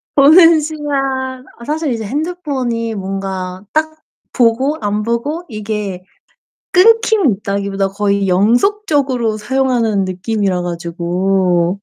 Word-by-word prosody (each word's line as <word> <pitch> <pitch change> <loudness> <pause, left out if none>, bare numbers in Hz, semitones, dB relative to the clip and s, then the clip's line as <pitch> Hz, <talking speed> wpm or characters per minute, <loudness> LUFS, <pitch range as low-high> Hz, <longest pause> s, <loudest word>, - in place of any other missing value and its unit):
보는 320 +3 +7
시간 270 -4 -3
아 235 - -11
사실 305 0 -2
이제 225 -1 -4
핸드폰이 265 - -3
뭔가 190 -1 -5
딱 315 0 0 0.4
보고 255 +5 +2
안 210 0 -1
보고 235 +9 -2
이게 210 -4 -4 0.7
끊김이 430 - +4
있다기보다 200 -1 -2
거의 200 0 0
연속적으로 245 - +1
사용하는 235 -4 0
느낌이라 185 0 -1
가지고 175 +1 0
230 Hz, 250 characters per minute, -16 LUFS, 195-290 Hz, 0.7 s, 보는